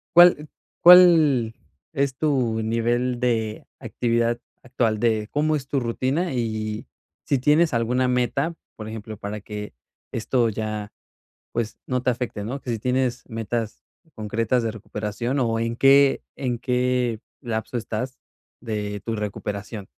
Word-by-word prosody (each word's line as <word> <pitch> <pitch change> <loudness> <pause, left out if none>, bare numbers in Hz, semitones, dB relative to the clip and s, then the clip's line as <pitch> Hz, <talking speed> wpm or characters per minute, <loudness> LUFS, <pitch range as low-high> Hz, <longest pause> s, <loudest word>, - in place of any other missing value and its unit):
¿Cuál 175 -4 +7 0.3
cuál 160 -10 +7 0.4
es 140 -2 0
tu 125 -7 +1
nivel 120 +2 0
de 110 -3 -1
actividad 120 0 0 0.2
actual, 120 -4 0
de 110 -2 +1
cómo 155 +1 +1
es 135 -2 -4
tu 140 - 0
rutina? 130 +8 -1
Y 110 -3 -3 0.4
si 140 - +1
tienes 150 +3 +3
alguna 125 +2 +1
meta, 125 +6 0 0.2
por 110 -1 -8
ejemplo, 110 -1 -7
para 100 +1 -5
que 105 -5 -7 0.4
esto 115 +1 +1
ya, 105 -1 -4 0.6
pues, 115 -1 -3
no 125 -1 -1
te 130 - +2
afecte, 120 -4 -3
¿no? 130 +6 -4
¿Qué 125 - -6
si 115 - -1
tienes 125 +1 0
metas 115 -1 -3 0.3
concretas 115 +3 0
de 115 - -1
recuperación 110 +4 -3
o 115 -2 +1
en 115 +1 -1
qué 135 +1 +5
en 125 -3 -2
qué 125 -2 0 0.2
lapso 115 -1 -3
estás 120 +2 -4 0.4
de 105 -3 -4
tu 115 +1 -3
recuperación? 105 0 -5
120 Hz, 140 wpm, -24 LUFS, 110-130 Hz, 0.6 s, Cuál